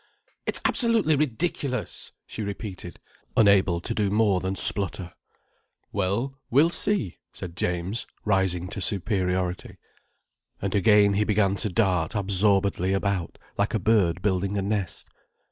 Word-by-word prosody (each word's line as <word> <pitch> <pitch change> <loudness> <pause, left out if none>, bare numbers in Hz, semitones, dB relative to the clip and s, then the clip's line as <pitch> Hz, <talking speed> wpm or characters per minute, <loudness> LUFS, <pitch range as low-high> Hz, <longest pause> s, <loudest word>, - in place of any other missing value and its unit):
"It's - - -1
absolutely 230 -10 +2
ridiculous!" 140 -3 -2
she - - -7
repeated, 100 -4 -6 0.4
unable 100 -5 +4
to - - -3
do 105 -2 0
more 105 -2 +2
than 95 +1 -3
splutter. 95 -3 0 0.8
"Well, 105 +8 -2
we'll 150 +7 +4
see," 200 - -1
said 85 -2 -8
James, 90 +6 -2 0.2
rising 95 -3 +1
to 100 - -5
superiority. 95 -2 0 0.8
And 100 -1 -3
again 100 0 +5
he 105 +2 +2
began 105 -2 +2
to 105 - +1
dart 90 -5 +1
absorbedly 100 -1 +2
about, 95 -3 -2 0.2
like 105 +3 +1
a - - +1
bird 95 -5 +2
building 100 0 0
a 100 - -1
nest. 100 -3 -3
100 Hz, 130 wpm, -25 LUFS, 95-110 Hz, 0.8 s, again